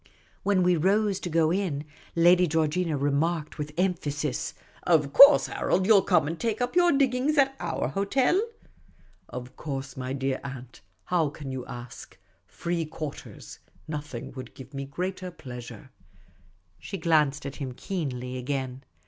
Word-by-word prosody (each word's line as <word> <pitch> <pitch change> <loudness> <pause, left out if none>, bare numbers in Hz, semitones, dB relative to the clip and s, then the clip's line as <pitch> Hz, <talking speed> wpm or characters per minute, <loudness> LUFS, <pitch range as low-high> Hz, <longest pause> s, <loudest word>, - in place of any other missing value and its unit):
When 195 -2 +2
we 180 -1 +3
rose 195 +3 +2
to 175 - -5
go 160 -1 +3
in, 170 -6 -1 0.3
Lady 175 +2 +5
Georgina 160 +1 0
remarked, 150 +3 0
with 150 0 -4
emphasis, 150 -6 -1
" - - -27 0.2
Of 140 -2 -5
course, 280 +1 +9
Harold, 185 +1 0
you 220 - +3
'11 195 -2 +4
come 175 -6 +4
and 165 +2 -4
take 225 -2 -1
up 245 +3 -1
your 350 -1 +5
diggings 275 +2 +2
at 270 -1 +4
our - - -2
hotel? 250 - +2 0.3
" - - -32
" - - -35
Of 125 +1 -13
course, 135 -3 -5
my 130 0 -4
dear 135 -1 -1
aunt. 130 -3 -8 0.2
How 170 -4 +1
can 140 -2 -8
you 130 -1 -5
ask? 120 0 -9 0.3
Free 170 -1 -2
quarters. 155 -2 -8 0.3
Nothing 150 -6 -6
would 130 -2 -9
give 130 +1 -12
me 140 0 -4
greater 185 +6 -4
pleasure." 125 -8 -10 0.9
She 195 - -6
glanced 150 -4 +2
at 140 - -6
him 135 -4 -4
keenly 130 -6 -4
again. 130 0 -3
155 Hz, 160 wpm, -27 LUFS, 135-185 Hz, 0.9 s, course